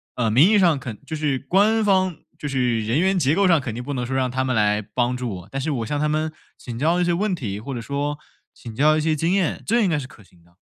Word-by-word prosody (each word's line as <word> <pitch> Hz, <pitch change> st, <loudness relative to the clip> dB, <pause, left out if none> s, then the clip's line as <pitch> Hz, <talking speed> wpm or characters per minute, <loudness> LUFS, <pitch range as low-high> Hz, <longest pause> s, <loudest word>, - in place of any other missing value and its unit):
呃， 115 Hz, -3 st, 0 dB
名 145 Hz, -, +6 dB
义 210 Hz, -2 st, +4 dB
上 170 Hz, -6 st, +4 dB
肯 120 Hz, -4 st, -7 dB
就 160 Hz, -, -5 dB
是 150 Hz, -3 st, -1 dB
官 205 Hz, -, +2 dB
方 185 Hz, -4 st, +2 dB, 0.2 s
就 150 Hz, -, -5 dB
是 125 Hz, -5 st, 0 dB
人 115 Hz, +8 st, +1 dB
员 190 Hz, +1 st, +2 dB
结 145 Hz, -4 st, +2 dB
构 200 Hz, 0 st, +3 dB
上 170 Hz, -4 st, +5 dB
肯 130 Hz, -6 st, -5 dB
定 120 Hz, +2 st, -6 dB
不 145 Hz, +3 st, -4 dB
能 125 Hz, -2 st, -2 dB
说 130 Hz, +2 st, -3 dB
让 130 Hz, -1 st, +1 dB
他 130 Hz, +1 st, -1 dB
们 130 Hz, -2 st, -1 dB
来 105 Hz, 0 st, +2 dB
帮 120 Hz, +4 st, -1 dB
助 125 Hz, -1 st, -3 dB
我， 90 Hz, +2 st, -11 dB
但 135 Hz, -, -3 dB
是 155 Hz, +3 st, -2 dB
我 120 Hz, -5 st, -2 dB
向 145 Hz, +5 st, -2 dB
他 150 Hz, -, +1 dB
们 155 Hz, +1 st, -1 dB, 0.3 s
请 115 Hz, -2 st, -8 dB
教 165 Hz, +6 st, +1 dB
一 175 Hz, -, +2 dB
些 175 Hz, -, +1 dB
问 200 Hz, +3 st, 0 dB
题， 105 Hz, -, -4 dB
或 135 Hz, +5 st, -6 dB
者 120 Hz, -, -4 dB
说 145 Hz, +3 st, -3 dB, 0.3 s
请 115 Hz, -2 st, -10 dB
教 155 Hz, +4 st, +4 dB
一 -, -, 0 dB
些 155 Hz, 0 st, +1 dB
经 165 Hz, +4 st, 0 dB
验， 195 Hz, -5 st, 0 dB
这 235 Hz, +2 st, +2 dB
应 195 Hz, -, +2 dB
该 160 Hz, -, +1 dB
是 135 Hz, -3 st, -5 dB
可 110 Hz, -, -17 dB
行 85 Hz, -3 st, -25 dB
的。 85 Hz, 0 st, -27 dB
140 Hz, 315 characters per minute, -22 LUFS, 120-170 Hz, 0.3 s, 名